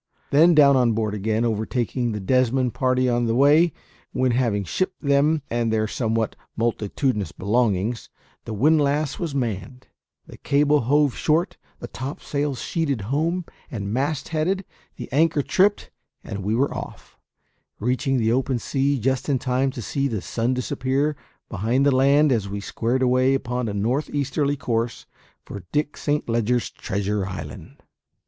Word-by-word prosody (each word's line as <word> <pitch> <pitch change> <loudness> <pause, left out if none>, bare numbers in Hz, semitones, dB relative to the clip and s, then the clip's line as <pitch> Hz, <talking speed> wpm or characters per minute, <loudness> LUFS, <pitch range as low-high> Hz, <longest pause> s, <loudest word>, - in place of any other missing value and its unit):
Then 165 +4 +6
down 140 -2 +7
on 125 -3 +3
board 110 -1 -1
again, 110 +3 0
overtaking 120 +2 -1
the 105 - -3
Desmond 125 +4 +1
party 130 -1 +1
on 120 -1 +1
the 115 - +1
way; 150 +6 +5 0.4
when, 130 0 +1
having 115 -5 +1
shipped 185 - -2
them 145 +2 +2
and 115 -1 -1
their 110 -1 +1
somewhat 110 0 -1 0.2
multitudinous 115 0 -1
belongings, 110 +1 0 0.4
the 110 - -5
windlass 145 +3 +2
was 165 -5 -3
manned, 125 0 -3 0.4
the - - -13
cable 145 +1 +3
hove 145 +2 +2
short, 165 +5 +1 0.2
the 120 - -7
topsails 140 +1 -4
sheeted 145 - -1
home 165 +4 0 0.2
and 105 -7 -4
mast 140 +3 -1
headed, 180 +5 -1 0.3
the - - -7
anchor 150 +1 +2
tripped, 200 +7 +1 0.3
and 100 - -6
we 105 +3 0
were 135 +4 +1
off, - - -8 0.6
reaching 130 +4 0
the 110 -2 +1
open 130 +1 +1
sea 140 +4 0
just 130 +4 -1
in 140 - +3
time 130 +2 0
to 125 -3 -6
see 140 +6 -1
the 110 -6 -2
sun 120 +2 -1
disappear 130 +4 -1 0.3
behind 115 +7 0
the 140 -2 +4
land 140 +3 +4
as 105 -5 0
we 100 +1 -4
squared 120 +5 -1
away 130 +1 +3
upon 125 -2 -2
a - - -4
north 120 +9 0
easterly 145 0 -1
course 115 -2 -2 0.4
for 100 - -7
Dick 150 0 -1
Saint 150 0 -1
Leger's 120 +1 0
treasure 100 -1 -2
island. 85 -6 -8
130 Hz, 155 wpm, -23 LUFS, 115-145 Hz, 0.6 s, down